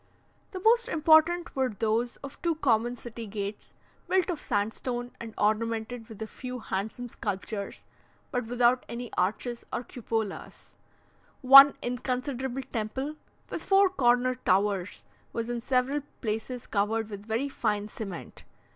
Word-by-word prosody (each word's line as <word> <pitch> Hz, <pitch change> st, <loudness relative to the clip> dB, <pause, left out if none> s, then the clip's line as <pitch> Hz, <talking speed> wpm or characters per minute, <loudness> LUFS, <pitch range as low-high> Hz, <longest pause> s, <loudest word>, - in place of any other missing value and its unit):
The 375 Hz, -, -6 dB
most 465 Hz, +4 st, +4 dB
important 320 Hz, +2 st, +4 dB
were 265 Hz, -1 st, +1 dB
those 225 Hz, +3 st, 0 dB
of 275 Hz, 0 st, -9 dB
two 335 Hz, -2 st, +1 dB
common 240 Hz, -5 st, +2 dB
city 235 Hz, -1 st, -8 dB
gates, 200 Hz, 0 st, -6 dB, 0.3 s
built 375 Hz, 0 st, +2 dB
of 330 Hz, -, -4 dB
sandstone 240 Hz, +3 st, -2 dB
and 225 Hz, -2 st, -8 dB
ornamented 225 Hz, +2 st, -1 dB
with 220 Hz, -1 st, -7 dB
a -, -, -3 dB
few 250 Hz, +3 st, -7 dB
handsome 220 Hz, +3 st, -4 dB
sculptures, 200 Hz, -2 st, -5 dB, 0.5 s
but 245 Hz, -3 st, -2 dB
without 245 Hz, +1 st, +3 dB
any 240 Hz, 0 st, -6 dB
arches 230 Hz, +6 st, -1 dB
or -, -, -2 dB
cupolas. 225 Hz, -5 st, -5 dB, 0.7 s
One 275 Hz, +2 st, +10 dB
inconsiderable 255 Hz, +1 st, -2 dB
temple, 260 Hz, +7 st, -3 dB, 0.4 s
with -, -, -3 dB
four 390 Hz, -1 st, +4 dB
corner 250 Hz, -5 st, +3 dB
towers, 200 Hz, -5 st, 0 dB, 0.3 s
was 230 Hz, +1 st, -2 dB
in 240 Hz, -1 st, -3 dB
several 260 Hz, +4 st, +1 dB, 0.2 s
places 225 Hz, +2 st, -3 dB
covered 215 Hz, +1 st, 0 dB
with 205 Hz, +1 st, -8 dB
very 230 Hz, +5 st, 0 dB
fine 210 Hz, -6 st, -1 dB
cement. 195 Hz, -5 st, -8 dB
240 Hz, 135 wpm, -28 LUFS, 220-265 Hz, 0.7 s, One